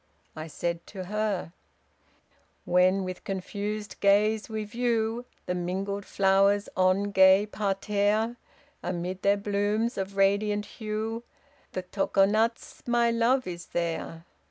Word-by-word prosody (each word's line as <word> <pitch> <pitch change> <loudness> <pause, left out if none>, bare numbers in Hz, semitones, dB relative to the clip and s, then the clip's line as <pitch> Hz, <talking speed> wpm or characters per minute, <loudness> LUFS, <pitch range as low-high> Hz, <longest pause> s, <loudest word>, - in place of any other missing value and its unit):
I 155 +1 -6
said 170 +2 -4
to 190 -2 -7
her: 205 -3 -2 1.1
When 185 +2 +3
with 185 -1 -6
confused 205 +2 -4
gaze 210 +2 +3
we 220 -1 -3
view 230 +1 -1 0.2
The 180 - -1
mingled 190 +3 -3
flowers 195 +1 +3
on 185 +2 +2
gay 190 +1 +6
parterre, 210 +2 0 0.5
Amid 180 +1 -4
their 200 +1 +3
blooms 205 +3 0
of 195 +1 -4
radiant 205 +1 +2
hue 220 +1 -4 0.5
The 185 - -3
Tokonatz, 205 +4 +1
my 240 -1 +3
love, 240 +3 +2
is 175 -1 -6
there. 165 -1 -3
200 Hz, 115 wpm, -27 LUFS, 185-215 Hz, 1.1 s, gay